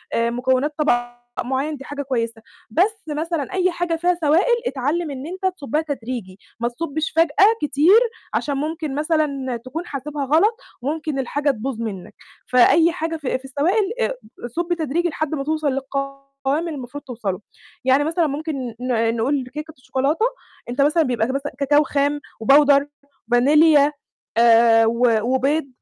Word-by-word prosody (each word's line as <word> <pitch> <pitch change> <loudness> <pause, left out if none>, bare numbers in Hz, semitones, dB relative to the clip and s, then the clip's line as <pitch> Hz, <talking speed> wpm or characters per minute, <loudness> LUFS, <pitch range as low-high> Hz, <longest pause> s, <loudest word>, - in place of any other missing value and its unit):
مكونات 255 +5 +1
طَبَق 240 -5 0 0.2
معيّن 270 +4 -2
دي 270 - -10
حاجة 285 0 -5
كويسة، 230 -4 -2 0.3
بس 400 - +1
مثلًا 320 +3 -3
أي 370 -1 +2
حاجة 345 -1 -1
فيها 350 +2 +1
سوائل 330 +11 +4
اتعلِّم 290 +5 -1
إن 270 0 -6
أنت 375 +1 -2
تصُبَّها 300 -1 -1
تدريجي، 235 -9 -6 0.2
ما 235 - 0
تصُبِّش 310 +5 -3
فجأة 330 +4 +5
كتير 300 - +5 0.3
عشان 285 -2 -1
ممكن 310 -1 -3
مثلًا 290 -5 -1
تكون 320 +7 -5
حاسبها 285 0 -4
غلط، 350 - +3 0.2
وممكن 305 +1 -2
الحاجة 285 +2 0
تبوظ 230 0 -5
منك، 195 -5 -6 0.3
فأي 320 +7 +5
حاجة 330 -1 -3
في 275 -4 -2
في 265 - -15
السوائل 360 +10 +1
آآ، - - 0 0.3
صُبّ 345 +8 -2
تدريجي 335 +2 -1
لحد 310 0 -2
ما 275 - -3
توصل 310 0 -1
للقوام 275 +1 -3 0.4
اللي 340 - -3
المفروض 285 -1 -7
توصلُه. 220 -8 -4 0.4
يعني 265 +2 +4
مثلًا 325 +2 +1
ممكن 305 +2 -3 0.2
ن 230 -2 0
نقول 260 +3 0
كيكة 305 +1 -6
الشوكولاتة، 275 - 0 0.4
أنت 250 +3 -1
مثلًا 305 +3 +4
بيبقى 240 -5 0
مث 270 +2 -2 0.2
كاكاو 290 +2 +4
خام 285 +1 0 0.2
وpowder 280 +2 +6 0.5
فانيليا 290 +3 +5 0.5
آآ، 230 -1 +6
و 235 0 +3 0.2
وبيض، 275 +3 +1
285 Hz, 150 wpm, -21 LUFS, 255-315 Hz, 0.5 s, وpowder